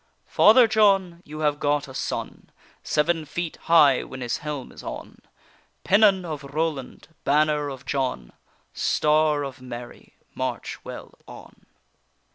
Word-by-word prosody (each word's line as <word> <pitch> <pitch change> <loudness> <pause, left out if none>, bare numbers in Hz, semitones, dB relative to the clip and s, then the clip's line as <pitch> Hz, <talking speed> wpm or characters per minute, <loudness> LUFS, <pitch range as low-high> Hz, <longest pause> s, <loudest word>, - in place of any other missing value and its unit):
Father 250 -3 +6
John, 195 -5 +2
you 155 +1 -8
have 150 -1 +1
got 145 0 0
a 130 - -11
son, - - -5 0.3
Seven 165 +2 0
feet 165 +3 -5
high 150 -6 +6
when 130 - -9
his 120 -1 -2
helm 150 -4 -6
is - - -12
on - - -8 0.6
Pennon 200 -4 +4
of 155 -3 -6
Roland, 145 -1 -4
banner 150 0 +2
of 135 -1 -9
John, 130 - -3 0.4
Star 150 -1 +2
of 135 -1 -7
Mary, 120 -1 -10 0.2
march - - -4
well - - -9
on. - - -14
150 Hz, 130 wpm, -24 LUFS, 135-165 Hz, 0.6 s, Father